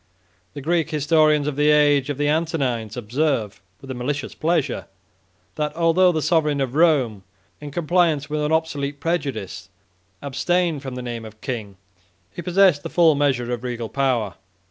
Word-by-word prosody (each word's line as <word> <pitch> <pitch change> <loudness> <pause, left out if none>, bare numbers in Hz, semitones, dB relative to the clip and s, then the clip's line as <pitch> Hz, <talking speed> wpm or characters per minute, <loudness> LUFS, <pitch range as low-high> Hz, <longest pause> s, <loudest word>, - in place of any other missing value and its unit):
The 145 - -6
Greek 165 +1 0
historians 155 -1 +3
of 150 - -2
the 150 +1 +3
age 145 -2 +4
of 145 - -2
the 145 0 0
Antonines 140 -9 -1
70 - - -3
observe, 120 -5 -1 0.2
with 135 - -8
a - - -3
malicious 135 +4 -3
pleasure, 155 -5 -1 0.7
that 150 0 -2
although 170 +2 +4
the 155 -3 -2
sovereign 150 -4 +2
of 130 -2 -1
Rome, 140 - +2 0.4
in 150 - -7
compliance 165 -1 +1
with 150 0 -2
an 150 +1 -1
obsolete 145 -3 -1
prejudice, 130 - -3 0.5
abstained 165 +3 0
from 130 -2 -6
the 125 - -5
name 120 -2 -5
of 110 0 -12
king, 110 -7 -5 0.5
he 175 - -7
possessed 180 -4 +3
the - - -6
full 165 -3 +4
measure 130 -4 0
of 120 0 -5
regal 120 -2 -4
power. 125 -8 0
145 Hz, 165 wpm, -22 LUFS, 125-160 Hz, 0.7 s, age